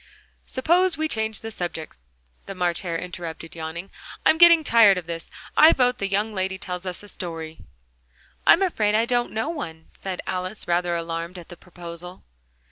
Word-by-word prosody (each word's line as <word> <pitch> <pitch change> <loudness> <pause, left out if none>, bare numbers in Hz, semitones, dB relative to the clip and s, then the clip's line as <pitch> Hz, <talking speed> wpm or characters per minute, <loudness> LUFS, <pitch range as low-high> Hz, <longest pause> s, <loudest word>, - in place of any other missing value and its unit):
"Suppose 345 +7 +2
we 315 0 0
change 220 -5 -1
the 225 - -6
subject," 170 - -5 0.5
the 195 - -6
March 175 -2 0
Hare 170 -3 -2
interrupted, 165 -2 -7
yawning. 165 +3 -6 0.3
"I'm 320 - +5
getting 340 -2 +8
tired 225 -7 +6
of 180 - -4
this. 165 0 -6 0.3
I 315 +2 +8
vote 250 -1 +2
the 200 - 0
young 205 +3 0
lady 190 -1 -2
tells 180 -1 -5
us 180 +2 -4
a - - -11
story." 165 -4 -6 0.9
"I'm 375 - +7
afraid 215 - +1
I 225 +1 +3
don't 240 0 +1
know 220 +8 -2
one," 160 - -6
said 190 -2 -4
Alice, 185 +3 -4
rather 175 0 +1
alarmed 170 +1 -4
at 175 - -11
the 175 - -9
proposal. 175 0 -10
185 Hz, 175 wpm, -24 LUFS, 170-225 Hz, 0.9 s, getting